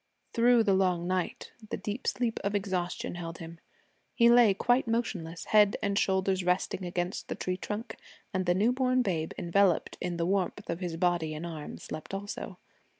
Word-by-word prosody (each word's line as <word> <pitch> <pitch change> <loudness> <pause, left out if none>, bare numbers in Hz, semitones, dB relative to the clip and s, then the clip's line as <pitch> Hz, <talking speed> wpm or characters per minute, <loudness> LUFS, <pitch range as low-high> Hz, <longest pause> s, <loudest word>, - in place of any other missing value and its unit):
Through 235 0 +5
the 200 -3 +3
long 180 -3 +2
night 185 -1 -2 0.2
the - - -2
deep 215 +5 -5
sleep 240 -2 0
of 200 +1 -1
exhaustion 185 -3 -2
held 170 -1 -6
him. 165 0 -9 0.6
He 235 -1 +6
lay 235 -5 +6
quite 245 +4 +2
motionless, 190 -8 -2
head 210 -1 +4
and 200 0 0
shoulders 190 -1 +1
resting 180 +1 0
against 175 +1 -3
the - - -3
tree 185 - -2
trunk, 220 +4 -5 0.4
and 185 -1 -1
the 175 - +3
new 215 +6 +3
born 255 0 +2
babe 165 -6 -1
enveloped 180 +1 +2
in 175 -1 -2
the 170 - 0
warmth 195 +2 -1
of 170 - -3
his 175 -3 -4
body 170 -3 +1
and 155 +3 -5
arms 160 -3 -7
slept 155 +5 -6
also. 200 -1 -6
190 Hz, 180 wpm, -29 LUFS, 175-210 Hz, 0.6 s, He